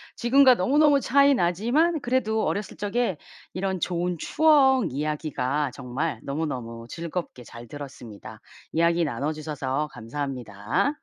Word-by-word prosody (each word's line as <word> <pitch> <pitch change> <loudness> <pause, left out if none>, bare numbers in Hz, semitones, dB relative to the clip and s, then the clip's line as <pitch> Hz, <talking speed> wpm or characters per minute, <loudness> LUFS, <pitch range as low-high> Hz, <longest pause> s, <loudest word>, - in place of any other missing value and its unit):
지금과 260 +2 +5
너무너무 285 +8 +4
차이 280 +2 +4
나지만 245 - +1
그래도 220 -3 0
어렸을 205 0 -3
적에 205 -3 -1 0.4
이런 190 0 -2
좋은 175 -1 -1
추억 275 - +4
이야기가 150 -2 -2
정말 130 0 -3
너무너무 125 -6 -4
즐겁게 170 -4 -6
잘 120 0 -11
들었습니다. 130 -7 -10 0.3
이야기 170 +1 +2
나눠주셔서 150 +1 -3
감사합니다. 120 - -3
165 Hz, 315 characters per minute, -25 LUFS, -, 0.4 s, 지금과